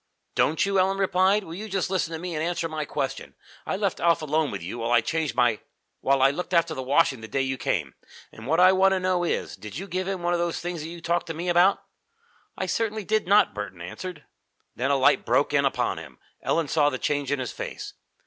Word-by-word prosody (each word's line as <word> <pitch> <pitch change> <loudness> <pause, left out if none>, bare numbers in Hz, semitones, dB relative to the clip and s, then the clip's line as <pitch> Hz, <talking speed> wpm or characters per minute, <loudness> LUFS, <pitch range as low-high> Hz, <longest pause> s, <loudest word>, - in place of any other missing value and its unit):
"Don't 160 +5 +2
you!" 195 -1 +1
Ellen 190 +1 +2
replied. 195 +2 +3
"Well, 165 -2 -8
just 195 -2 -1
you - - -3
listen 175 -3 0
to - - -2
me 175 +1 -5
and 155 0 -2
answer 170 0 -1
my 155 -2 -4
question. - - -4 0.3
I - - -1
left 200 -3 -1
Alf 170 -2 +2
alone 155 0 +1
with 100 -4 -6
you 100 +8 -6
while 115 +1 -2
I 120 - +6
changed 160 +3 -2
my 120 -3 +3 0.4
while 135 0 +2
I 135 - +6
looked 180 +4 -3
after 170 -1 +3
the 135 - -4
washing 130 -2 +2
the 110 - -8
day 135 +4 0
you 135 0 -1
came, - - -2 0.4
and - - -11
what 160 +4 +2
I 185 +1 +8
want 190 0 +4
to 190 - +1
know 185 -1 +1
is, 175 - -2
did 105 +5 -9
you 190 - -5
give 185 0 -3
him 190 -3 -3
one 175 0 +1
of 175 - +1
those 170 -1 -1
things 175 -2 -4
that 160 - -6
you 170 0 -9
talked 170 +1 0
to 165 - -4
me 175 +3 -3
about?" 175 +3 +4 0.7
"I - - -1
certainly 220 -1 -1
did 215 0 0
not," 205 +2 +5
Burton 105 -4 -6
answered. 150 - -7 0.5
Then 130 +3 -1
a 140 - +3
light 135 - +4
broke - - +2
in - - +3
upon - - 0
him. - - -12 0.2
Ellen 165 -2 0
saw 145 0 +3
the 130 - -3
change 145 0 -1
in 145 - +1
his 130 -3 -4
face. - - -6
165 Hz, 245 wpm, -25 LUFS, 140-185 Hz, 0.7 s, I